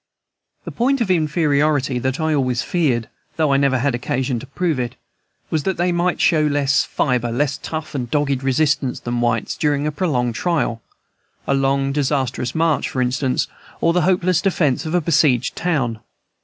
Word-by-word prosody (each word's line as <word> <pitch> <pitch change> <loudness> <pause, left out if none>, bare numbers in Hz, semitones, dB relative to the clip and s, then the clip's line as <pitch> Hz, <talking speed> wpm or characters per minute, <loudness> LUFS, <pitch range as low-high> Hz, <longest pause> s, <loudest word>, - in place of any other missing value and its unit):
The - - -5
point 270 +3 +1
of 220 -6 +1
inferiority 150 -5 +1
that 130 +3 -2
I 160 0 +1
always 125 -4 0
feared, 125 -9 0 0.3
though 155 -3 +2
I - - +4
never 135 -1 +2
had 135 +1 0
occasion 125 +1 -1
to 130 - -10
prove 160 0 -1
it, 120 -1 -3 0.6
was 155 - +1
that 190 +4 -2
they 175 +1 +1
might 175 +1 0
show 160 -2 +3
less 145 -2 +2
fibre, 125 -3 -1
less 140 +4 -1
tough 155 -1 -5
and 125 -4 -3
dogged 140 -2 0
resistance, 140 0 +1
than 120 0 -2
whites, 115 -2 0
during 145 -1 0
a 150 - 0
prolonged 130 -8 0
trial, 140 -6 -1 0.6
a - - +1
long, 135 0 +1
disastrous 135 -3 -1
march, 160 -2 +1
for 130 - -4
instance, 130 +1 0 0.3
or 165 - +2
the 180 - +2
hopeless 180 -1 +2
defence 160 -6 +1
of 160 - -1
a 175 - +3
besieged 145 -6 +2
town. 135 -11 -1
140 Hz, 175 wpm, -20 LUFS, 125-160 Hz, 0.6 s, I